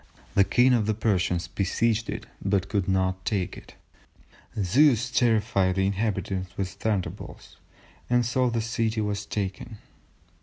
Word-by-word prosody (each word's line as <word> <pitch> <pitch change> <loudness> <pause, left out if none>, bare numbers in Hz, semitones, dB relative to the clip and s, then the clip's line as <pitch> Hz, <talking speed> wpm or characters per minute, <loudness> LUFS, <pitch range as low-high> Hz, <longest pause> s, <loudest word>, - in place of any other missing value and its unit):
the 100 - +5
King 125 +5 +4
of 110 -4 +2
the 110 - +1
Persians 90 -5 0
besieged 115 +3 0
it - - -4 0.2
but 100 -1 0
could 100 -3 0
not 95 0 0
take 95 -3 -1
it; - - -13 0.8
Zeus 125 +5 +3
terrified 105 -6 +2
the 95 0 +1
inhabitants 95 -2 -2
with 95 -2 -1
thunderbolts, 100 0 -4 0.5
and 120 0 +3
so 125 +2 +1
the 115 -1 -1
city 115 -1 -1
was 105 -1 -2
taken." 105 +3 -4
105 Hz, 140 wpm, -26 LUFS, 95-115 Hz, 0.8 s, the